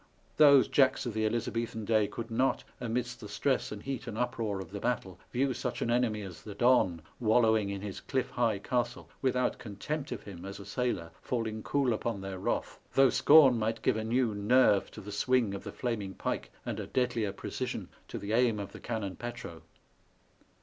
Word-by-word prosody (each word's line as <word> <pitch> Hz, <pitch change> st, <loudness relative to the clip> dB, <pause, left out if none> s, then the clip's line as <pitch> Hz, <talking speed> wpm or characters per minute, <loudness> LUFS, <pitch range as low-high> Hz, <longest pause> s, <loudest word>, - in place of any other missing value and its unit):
those 140 Hz, -3 st, +7 dB
Jacks 135 Hz, -2 st, +3 dB
of 120 Hz, -, -3 dB
the 110 Hz, 0 st, +1 dB
Elizabethan 115 Hz, -1 st, -2 dB
day 110 Hz, -1 st, +3 dB
could 115 Hz, +2 st, -7 dB
not, 130 Hz, +4 st, +1 dB, 0.2 s
amidst 120 Hz, +1 st, -2 dB
the 105 Hz, -, -9 dB
stress 130 Hz, +6 st, 0 dB
and 105 Hz, -1 st, -7 dB
heat 135 Hz, -1 st, -4 dB
and 110 Hz, -2 st, -5 dB
uproar 115 Hz, -4 st, -1 dB
of 95 Hz, -, -8 dB
the 100 Hz, -, -5 dB
battle, 100 Hz, -6 st, -2 dB
view 130 Hz, +1 st, +1 dB
such -, -, -3 dB
an 120 Hz, -, 0 dB
enemy 115 Hz, -3 st, +1 dB
as 90 Hz, -5 st, -9 dB
the 105 Hz, -2 st, -9 dB
Don, 100 Hz, -9 st, +3 dB, 0.2 s
wallowing 110 Hz, -3 st, +3 dB
in 100 Hz, -1 st, -4 dB
his 100 Hz, -2 st, -5 dB
cliff 130 Hz, -2 st, -2 dB
high 115 Hz, -4 st, +1 dB
castle, 120 Hz, +3 st, -2 dB
without 125 Hz, -1 st, +1 dB
contempt 135 Hz, +8 st, -5 dB
of -, -, -5 dB
him 90 Hz, -4 st, -9 dB
as 100 Hz, +1 st, -7 dB
a 100 Hz, -, -9 dB
sailor 120 Hz, -10 st, -2 dB
faUing 110 Hz, -3 st, -2 dB
cool 135 Hz, -4 st, +1 dB
upon 110 Hz, -1 st, -2 dB
their 95 Hz, -1 st, -5 dB
wrath, -, -, -2 dB, 0.2 s
though 135 Hz, -2 st, +6 dB
scorn 140 Hz, -5 st, +7 dB
might 110 Hz, +1 st, -1 dB
give -, -, +3 dB
a 110 Hz, -, -2 dB
new 115 Hz, 0 st, +1 dB
nerve 105 Hz, 0 st, +4 dB
to 105 Hz, -, -10 dB
the 105 Hz, +1 st, -8 dB
swing 115 Hz, 0 st, +2 dB
of 100 Hz, -, -6 dB
the -, -, -6 dB
flaming 105 Hz, -6 st, -3 dB
pike, -, -, -3 dB
and -, -, -3 dB
a -, -, -5 dB
deadlier 125 Hz, -5 st, 0 dB
pre 100 Hz, -, -7 dB
cision -, -, -3 dB, 0.2 s
to -, -, -6 dB
the 100 Hz, +2 st, -4 dB
aim 120 Hz, -2 st, +3 dB
of 100 Hz, -, -5 dB
the -, -, -10 dB
cannon 110 Hz, -6 st, -3 dB
petro. 120 Hz, -9 st, -7 dB
115 Hz, 200 wpm, -31 LUFS, 100-125 Hz, 0.2 s, those